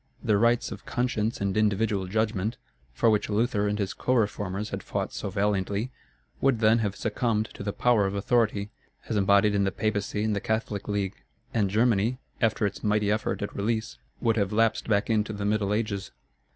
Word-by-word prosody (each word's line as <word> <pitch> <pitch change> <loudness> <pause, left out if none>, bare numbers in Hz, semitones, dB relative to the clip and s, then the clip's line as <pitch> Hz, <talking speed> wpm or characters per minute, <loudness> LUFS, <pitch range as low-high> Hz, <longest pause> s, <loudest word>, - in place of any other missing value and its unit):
The 105 -4 +3
rights 115 +1 +2
of 105 -2 -8
conscience 120 -3 -1
and 100 -1 -1
individual 105 -2 +1
judgment, 110 +1 -1 0.3
for 110 - +3
which 105 0 +1
Luther 105 -1 +1
and 105 0 0
his 100 -2 -2
co 130 - 0
reformers 105 -2 -1
had - - -3
fought - - -3
so - - -4
valiantly, 100 +3 0 0.5
would 135 -4 +3
then 110 +1 +4
have 105 -3 -1
succumbed 110 0 -1
to - - -9
the 100 0 -2
power 110 -1 +3
of 95 - -3
authority, 105 -1 +1 0.4
as 110 - 0
embodied 100 +1 +4
in 100 -1 +2
the 95 - +1
Papacy 105 +1 -1
and 110 -1 +1
the 100 - -2
Catholic 110 -2 -2
League; 100 -2 -2 0.3
and 105 -4 +2
Germany, 115 +2 +2 0.2
after 110 -2 +2
its 100 - -3
mighty 105 -1 +2
effort 110 0 -1
at 100 - -5
release, 110 +2 -2 0.2
would 115 -1 +1
have 100 -2 +1
lapsed 115 +1 +2
back 100 -1 +2
into 110 -1 +1
the 100 -1 -4
Middle 105 -1 +1
Ages. 105 -2 -1
105 Hz, 190 wpm, -27 LUFS, 100-110 Hz, 0.5 s, then